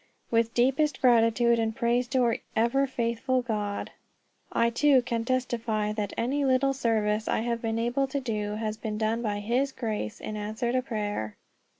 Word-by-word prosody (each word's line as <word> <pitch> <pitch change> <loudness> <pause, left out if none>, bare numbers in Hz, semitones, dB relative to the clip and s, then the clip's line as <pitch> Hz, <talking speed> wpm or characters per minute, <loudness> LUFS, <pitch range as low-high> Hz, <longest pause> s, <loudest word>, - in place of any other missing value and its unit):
With 230 0 +1
deepest 270 +4 +2
gratitude 235 -1 +4
and 220 -1 -1
praise 240 +1 +1
to 260 0 +1
our 235 -1 +2 0.2
ever 240 +5 +2
faithful 250 +1 -1
God, 210 -3 -3 0.6
I 235 0 +2
too 265 +1 +4
can 230 -1 -2
testify 230 -4 -1
that 210 -2 -3
any 275 +5 0
little 270 0 +3
service 220 -4 0
I - - +1
have 235 0 -2
been 225 -1 -1
able 240 +4 0
to 280 +1 -2
do 210 -5 -3
has 215 0 -3
been 215 -1 -4
done 220 +2 0
by 205 -3 -2
his 250 +6 0
grace 215 - -4
in 215 - -5
answer 215 +3 -2
to 255 +1 +1
prayer. 205 - -3
235 Hz, 175 wpm, -27 LUFS, 215-255 Hz, 0.6 s, gratitude